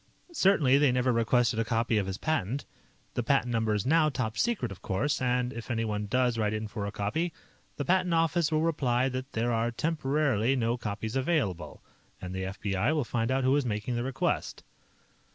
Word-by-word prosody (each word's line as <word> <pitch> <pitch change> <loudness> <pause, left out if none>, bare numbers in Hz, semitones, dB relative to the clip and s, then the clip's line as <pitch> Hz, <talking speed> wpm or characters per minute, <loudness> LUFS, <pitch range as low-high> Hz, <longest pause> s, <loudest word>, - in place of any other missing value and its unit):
Certainly 155 - +4
they 145 -3 +4
never 125 0 +1
requested 115 0 +2
a - - +2
copy 115 -1 +1
of 100 - -2
his 95 0 -3
patent. 145 -4 -1 0.5
The - - -1
patent 125 0 +1
number 115 -2 +1
is 105 - -2
now 155 +2 +4
top 125 -6 -3
secret, 215 - 0
of 95 - -10
course, 130 +11 -1
and 125 0 0
if 120 +1 -8
anyone 110 -3 -1
does 125 +1 +1
write 105 -1 +1
in 110 0 -3
for 105 -1 -4
a - - -4
copy, 135 - -1 0.5
the 145 - -2
Patent 185 -1 +2
Office 165 -1 +2
will 155 0 +2
reply 135 -6 +1
that 130 +1 -5
there 120 +2 0
are 115 +1 +1
temporarily 135 -3 0
no 120 -2 +1
copies 110 0 -4
available. 135 - -1 0.4
And 90 0 -6
the 95 0 -3
FBI 100 +7 -1
will 150 - +1
find 115 -1 -1
out 130 0 +1
who 130 +2 +3
is 145 - +2
making 110 0 -2
the 120 - -1
request." 130 +1 -2
125 Hz, 195 wpm, -29 LUFS, 110-140 Hz, 0.5 s, Certainly